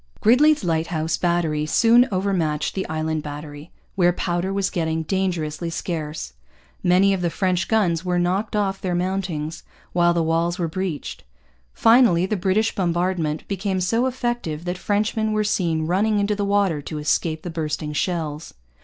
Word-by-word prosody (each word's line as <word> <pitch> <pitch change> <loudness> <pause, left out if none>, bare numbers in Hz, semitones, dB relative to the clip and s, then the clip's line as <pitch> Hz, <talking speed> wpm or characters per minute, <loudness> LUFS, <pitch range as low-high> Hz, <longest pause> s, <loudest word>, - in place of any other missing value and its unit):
Gridley's 285 +5 +4
Lighthouse 160 -1 0
Battery 165 -4 0
soon 235 +8 +5
over 195 +1 0
matched 155 -4 -1
the 190 - -4
Island 155 0 -2
Battery, 145 +1 -8 0.2
where 175 -2 +3
powder 175 +1 -2
was 195 -1 -1
getting 160 -3 -1
dangerously 170 -3 -2
scarce. 155 - -4 0.5
Many 185 +2 +4
of 190 - -2
the 175 - +1
French 185 +1 0
guns 185 -7 +1
were 180 -1 0
knocked 190 +5 0
off 195 -2 0
their 180 -2 -1
mountings, 175 -4 -2 0.3
while 175 0 +3
the 170 - +2
walls 165 +2 0
were 170 - -1
breached. 175 -2 -4 0.5
Finally, 225 - +4
the 215 - -1
British 195 +4 +1
bombardment 175 -3 -1
became 195 -1 -2
so 225 +8 +1
effective 240 -11 -3
that 180 +1 -3
Frenchmen 215 +2 0
were 215 0 +1
seen 170 -6 0
running 205 +6 +1
into 205 +1 +1
the 205 0 -1
water 200 -6 +1
to 155 +2 -6
escape 155 +1 0
the 175 - -5
bursting 155 -2 -3
shells. 155 -1 -3
175 Hz, 160 wpm, -22 LUFS, 160-195 Hz, 0.5 s, soon